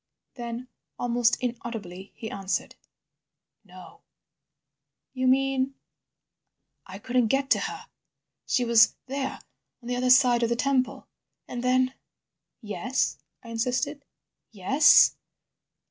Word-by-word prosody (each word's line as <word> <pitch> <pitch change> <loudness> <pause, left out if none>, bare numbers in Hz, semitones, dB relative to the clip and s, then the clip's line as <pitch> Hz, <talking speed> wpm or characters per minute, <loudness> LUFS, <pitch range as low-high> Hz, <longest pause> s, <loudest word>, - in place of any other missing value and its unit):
Then, 240 0 -6 0.3
almost 240 -1 +1
inaudibly, 225 -6 -6
he 220 - -7
answered, 195 -1 -3 0.9
"no." 185 - -15 1.1
"You 255 -1 -1
mean?" 270 0 +1 1.1
"I 185 0 -8
couldn't 245 +3 0
get 270 +4 0
to - - +5
her. - - -5 0.6
She 250 - +1
was 230 -1 +5
there 270 0 -4 0.4
on 240 - -13
the 250 - -1
other 250 +1 0
side 250 -2 +5
of 235 - +1
the 235 - +1
temple— 260 0 0 0.4
And 240 - -5
then—" 255 +1 +2 0.7
"Yes," 245 +5 -2 0.2
I 230 - -11
insisted. 250 +5 -2 0.5
"Yes?" 275 +9 +5
245 Hz, 110 wpm, -26 LUFS, 230-260 Hz, 1.1 s, to